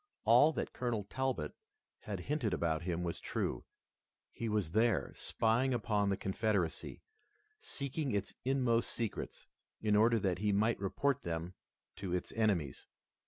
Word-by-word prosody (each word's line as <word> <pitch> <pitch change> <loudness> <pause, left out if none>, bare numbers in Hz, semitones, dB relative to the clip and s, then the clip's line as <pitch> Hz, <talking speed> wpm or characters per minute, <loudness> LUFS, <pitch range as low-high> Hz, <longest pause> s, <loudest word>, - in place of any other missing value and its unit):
All 125 +8 +7
that - - -3
Colonel 120 -4 -1
Talbot 130 -7 -2 0.5
had 100 -4 -5
hinted 130 -5 0
about 80 -2 0
him 85 0 -2
was 85 -1 -3
true. - - -2 0.7
He 115 - -3
was 105 -7 0
there, 110 +4 +2
spying 120 +4 +1
upon 105 -4 +1
the 95 - +1
Confederacy, 95 -3 -1 0.6
seeking 140 - -3
its 100 -1 -1
inmost 125 -3 +2
secrets, 115 -3 -4 0.3
in 105 -1 +2
order 115 +2 +5
that 95 -4 0
he 105 0 +2
might 110 +3 +2
report 140 +8 0
them 85 +1 -3 0.4
to 90 -2 -2
its 90 - -3
enemies. 100 - 0
110 Hz, 140 wpm, -34 LUFS, 95-120 Hz, 0.7 s, All